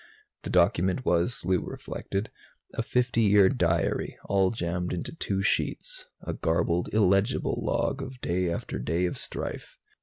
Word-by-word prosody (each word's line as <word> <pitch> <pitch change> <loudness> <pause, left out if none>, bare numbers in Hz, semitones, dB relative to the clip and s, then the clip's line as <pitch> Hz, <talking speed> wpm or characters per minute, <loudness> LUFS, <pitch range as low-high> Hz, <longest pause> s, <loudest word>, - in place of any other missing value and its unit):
The - - -6
document 90 +5 +2
was, 85 +5 +1
Lou 90 0 +3
reflected, 100 +6 -4 0.4
a - - -1
fifty 125 0 +1
year 100 -2 +6
diary, 85 - 0
all 95 -1 +3
jammed 90 -4 -2
onto 85 - -4
two 95 -11 -2
sheets - - -1 0.2
a - - -3
garbled, 85 +1 0
illegible 100 +2 +2
log 135 - 0
of 130 -1 -7
day 90 -4 0
after 85 - -3
day 85 +3 0
of 90 - -2
strife. - - -4
95 Hz, 145 wpm, -28 LUFS, 85-115 Hz, 0.4 s, year